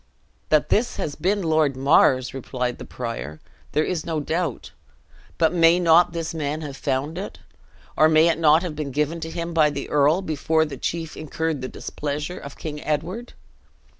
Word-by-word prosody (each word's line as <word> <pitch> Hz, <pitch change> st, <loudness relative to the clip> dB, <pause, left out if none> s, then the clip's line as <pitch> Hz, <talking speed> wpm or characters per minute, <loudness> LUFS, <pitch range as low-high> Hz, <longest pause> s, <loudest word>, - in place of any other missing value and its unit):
"That 155 Hz, -1 st, +3 dB
this 235 Hz, +3 st, +1 dB
has 145 Hz, -, -3 dB
been 190 Hz, +6 st, 0 dB
Lord 155 Hz, -4 st, +2 dB
Mar's," 130 Hz, -2 st, +4 dB
replied 125 Hz, -1 st, -3 dB
the -, -, -7 dB
prior, 115 Hz, -, -6 dB, 0.3 s
"there 155 Hz, -, +3 dB
is 170 Hz, -2 st, -2 dB
no 160 Hz, -2 st, -2 dB
doubt; 160 Hz, -1 st, -3 dB, 0.7 s
but 165 Hz, 0 st, +3 dB
may 170 Hz, 0 st, +5 dB
not 170 Hz, 0 st, +5 dB
this 165 Hz, -1 st, -4 dB
man 155 Hz, -1 st, -3 dB
have 145 Hz, -3 st, -6 dB
found 140 Hz, +5 st, -2 dB
it? 200 Hz, -, -6 dB, 0.6 s
Or 155 Hz, -, +5 dB
may 160 Hz, +1 st, +5 dB
it 165 Hz, -1 st, +1 dB
not 160 Hz, +1 st, +5 dB
have 170 Hz, -4 st, -4 dB
been 150 Hz, -2 st, -4 dB
given 150 Hz, +4 st, -1 dB
to 160 Hz, -, -5 dB
him 170 Hz, +1 st, -4 dB
by 155 Hz, -2 st, +4 dB
the 140 Hz, -1 st, -5 dB
earl, 150 Hz, +6 st, +3 dB
before 160 Hz, 0 st, +1 dB
that 140 Hz, -4 st, -8 dB
chief 165 Hz, -2 st, -3 dB
incurred 155 Hz, -1 st, -3 dB
the 130 Hz, -, -3 dB
displeasure 150 Hz, +6 st, -5 dB
of 140 Hz, -, -10 dB
King 150 Hz, -2 st, -6 dB
Edward? 180 Hz, +10 st, -3 dB
155 Hz, 180 wpm, -23 LUFS, 145-165 Hz, 0.7 s, may